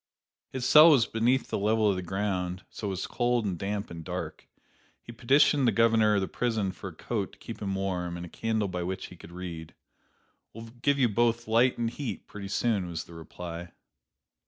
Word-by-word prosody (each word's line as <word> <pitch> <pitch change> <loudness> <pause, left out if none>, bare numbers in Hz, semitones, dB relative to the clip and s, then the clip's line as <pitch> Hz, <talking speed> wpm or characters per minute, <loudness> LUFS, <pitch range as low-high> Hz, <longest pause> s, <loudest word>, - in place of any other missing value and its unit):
His 130 -1 -3
cell 155 +2 +9
was 135 -7 +5
beneath 120 +4 +1
the - - 0
level 110 +1 +2
of 100 - +3
the 90 - -3
ground, 90 -1 -2
so 105 - -5
was 95 -1 -3
cold 120 -2 0
and 95 -3 -1
damp 100 +3 -4
and 85 -1 -7
dark. - - -6 0.5
He - - -11
petitioned 135 +3 +3
the - - +5
governor 115 -2 +4
of 100 - +2
the 95 - -1
prison 110 -5 -1
for 95 +1 -9
a 85 - -14
coat 105 +2 -3
to - - -17
keep 115 - -9
him 95 -2 -2
warm 90 -3 -2
and 85 - -6
a - - -11
candle 110 0 -1
by 90 -1 -4
which 95 +2 -3
he 90 - -11
could 85 - -13
read. 85 -3 -7 0.8
"We'll 115 0 -9
give 140 +1 +2
you 130 -3 +4
both 120 +2 +1
light 120 +3 +3
and 115 - 0
heat, 120 -3 -5
pretty 100 -1 -8
soon," 100 -2 0
was 80 -2 -4
the 85 - -15
reply. 85 +1 -8
105 Hz, 205 wpm, -28 LUFS, 90-115 Hz, 0.8 s, cell